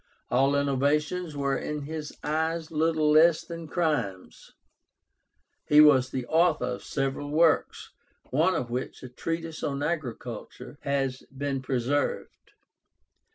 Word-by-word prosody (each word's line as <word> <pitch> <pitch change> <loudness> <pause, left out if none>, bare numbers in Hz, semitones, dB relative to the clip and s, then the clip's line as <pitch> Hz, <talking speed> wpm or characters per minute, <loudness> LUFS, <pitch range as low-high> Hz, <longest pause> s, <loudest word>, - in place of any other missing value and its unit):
All 135 +3 +3
innovations 145 +4 0
were 140 -1 0
in 150 +1 -4
his 155 0 -6
eyes 160 +2 -1
little 155 -1 +2
less 160 +1 +5
than 165 -1 -7
crimes. 150 - -2 1.2
He 150 - +6
was 135 -4 +6
the 130 -2 -4
author 160 -2 +2
of 125 0 -4
several 135 +1 -2
works, 160 +1 +2 0.4
one 165 +7 +3
of 120 -6 -3
which, 125 +2 -4
a 130 - -7
treatise 165 +5 -4
on 140 0 -2
agriculture, 125 -3 -5
has 135 -2 -1
been 135 0 -3
preserved. 130 +2 -2
145 Hz, 120 wpm, -27 LUFS, 135-160 Hz, 1.2 s, He